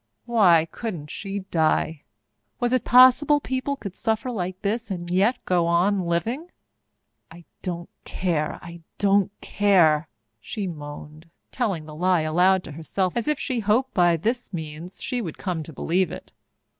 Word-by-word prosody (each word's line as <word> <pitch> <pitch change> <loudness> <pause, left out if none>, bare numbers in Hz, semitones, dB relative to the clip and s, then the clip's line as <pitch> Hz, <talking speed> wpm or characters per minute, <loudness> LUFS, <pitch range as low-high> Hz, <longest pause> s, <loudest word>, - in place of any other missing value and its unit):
Why 185 -9 +5
couldn't 175 -11 -6
she 200 0 -5
die? 160 -1 +1 0.6
Was 245 +1 0
it 255 - +2
possible 260 +4 +6
people 265 0 -2
could 200 -9 -8
suffer 225 +2 -1
like 185 -4 -4
this 225 +3 -1
and 175 -3 -4
yet 200 +7 +3
go 175 -2 +2
on 180 +2 +2
living? 230 - -2 0.8
"I 165 +1 -14 0.2
don't 175 -2 -4 0.2
care 160 -5 -2
I 170 0 -10 0.2
don't 200 -1 +3
care!" 170 -6 +3 0.3
she 210 - -5
moaned, 150 -1 -8 0.2
telling 195 -11 -2
the 155 - -10
lie 180 +2 +2
aloud 180 +4 +3
to - - -9
herself, 175 +4 -2
as 235 +2 -2
if 300 -1 +1
she 255 -4 -2
hoped 225 +5 +1
that 180 - +2
by 175 -1 +4
this 235 +8 -2
means 160 +1 -7
she 250 -1 -2
would 170 -8 -6
come 180 -4 -3
to 155 - -9
believe 175 +3 0
it. 185 - -9
185 Hz, 160 wpm, -24 LUFS, 165-225 Hz, 0.8 s, possible